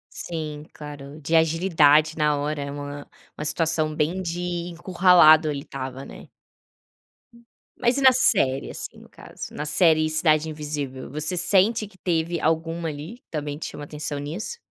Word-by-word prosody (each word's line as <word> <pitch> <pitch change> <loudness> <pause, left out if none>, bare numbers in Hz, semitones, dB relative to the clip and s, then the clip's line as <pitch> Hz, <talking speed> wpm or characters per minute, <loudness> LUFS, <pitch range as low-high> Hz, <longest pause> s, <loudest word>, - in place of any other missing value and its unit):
Sim, 155 -3 -5
claro, 145 0 -10
de 160 +3 +1
agilidade 160 -2 +3
na 150 -1 +2
hora, 145 +1 -3
é 140 - -5
uma 145 0 -7 0.3
uma 150 - -4
situação 155 0 +1
bem 155 +5 -1
de 175 -1 -4 0.3
encurralado, 175 -3 +5
ele 145 -2 -3
estava, 135 -1 -7
né. - - -12 1.5
Mas 245 +1 +2
e - - 0
na 260 -1 +8
série, 135 - +2
assim, - - -7
no - - -15
caso. - - -10
Na 150 - -4
série 155 0 +4
Cidade 155 0 +2
Invisível, 145 -4 -5
você 155 +5 -2
sente 200 +5 +3
que 195 -1 -19
teve 170 -1 -1
alguma, 165 +1 -1
ali, 155 +11 -8
também 145 -2 -4
que - - -5
chama 145 - -8
atenção 150 0 -5
nisso? 165 - -5
155 Hz, 155 wpm, -24 LUFS, 150-170 Hz, 1.5 s, na